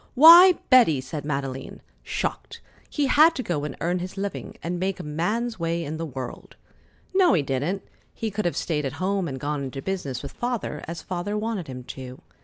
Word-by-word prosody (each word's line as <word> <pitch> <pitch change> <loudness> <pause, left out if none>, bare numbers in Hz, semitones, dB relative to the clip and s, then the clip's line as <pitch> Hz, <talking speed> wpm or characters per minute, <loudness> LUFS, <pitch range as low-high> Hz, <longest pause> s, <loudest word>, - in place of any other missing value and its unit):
"Why, 340 +6 +10 0.2
Betty!" 235 - +6
said 135 +3 -6
Madeleine, 135 -2 -4 0.2
shocked. - - -4 0.3
"He 295 - 0
had 310 +5 +5
to 255 - -3
go 150 -7 -2
and 150 - -6
earn 175 +2 0
his 185 +2 -6
living 200 0 -5
and 175 +1 -3
make 190 0 -2
a - - -5
man's 210 +10 -2
way 170 0 -1
in 155 +2 -4
the 165 0 -4
world." 130 -3 -8 0.6
"No, 375 - +5
he 160 -6 +2
didn't. 140 +9 -2 0.3
He 220 -1 -4
could 205 0 -3
have 175 - 0
stayed 150 -3 -1
at 135 - -3
home 190 -1 -1
and 135 -3 -5
gone 145 +1 -2
into 135 0 -5
business 145 -7 -4
with 140 - -6
Father, 240 -11 -3
as 165 -1 -6
Father 185 +3 -3
wanted 215 -5 -3
him 125 -1 -7
to. 130 0 -9
170 Hz, 200 wpm, -25 LUFS, 145-210 Hz, 0.6 s, Why